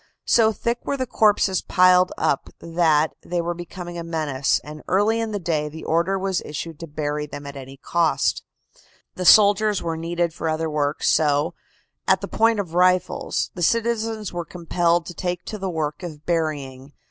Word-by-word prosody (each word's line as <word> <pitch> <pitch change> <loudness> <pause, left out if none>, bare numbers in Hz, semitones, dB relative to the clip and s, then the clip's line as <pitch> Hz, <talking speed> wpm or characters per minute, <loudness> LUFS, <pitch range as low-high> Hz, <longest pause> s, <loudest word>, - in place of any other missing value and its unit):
So 220 -2 +4
thick 235 +3 -2
were 280 - -2
the 260 - -1
corpses 210 -5 +2
piled 185 0 +4
up - - 0
that 160 -2 +2
they 175 0 -3
were 170 +1 -1
becoming 175 0 -8
a - - -5
menace, 155 -5 0
and 150 0 -9
early 210 +4 +2
in 225 -1 -2
the 205 - -2
day 155 -5 -1
the 160 +2 -10
order 170 +4 +1
was 190 -1 -1
issued 155 +1 -6
to 165 - -7
bury 150 0 -3
them 145 0 -8
at 140 0 -8
any 135 0 -9
cost. 170 +3 +1 0.7
The 180 - -5
soldiers 205 0 +5
were 165 -1 -2
needed 170 0 -1
for 160 - -3
other 160 0 -1
work, 145 0 -1
so, 150 +2 +2 0.5
at - - +4
the - - -5
point 225 -1 +2
of 180 -5 -4
rifles, 180 0 +1
the 180 - -7
citizens 225 0 0
were 175 0 -3
compelled 170 0 0
to 175 - -7
take 180 0 -4
to 215 - -6
the 190 0 -3
work 155 -2 -3
of 155 -4 -8
burying. 145 -5 -3
170 Hz, 180 wpm, -23 LUFS, 155-190 Hz, 0.7 s, soldiers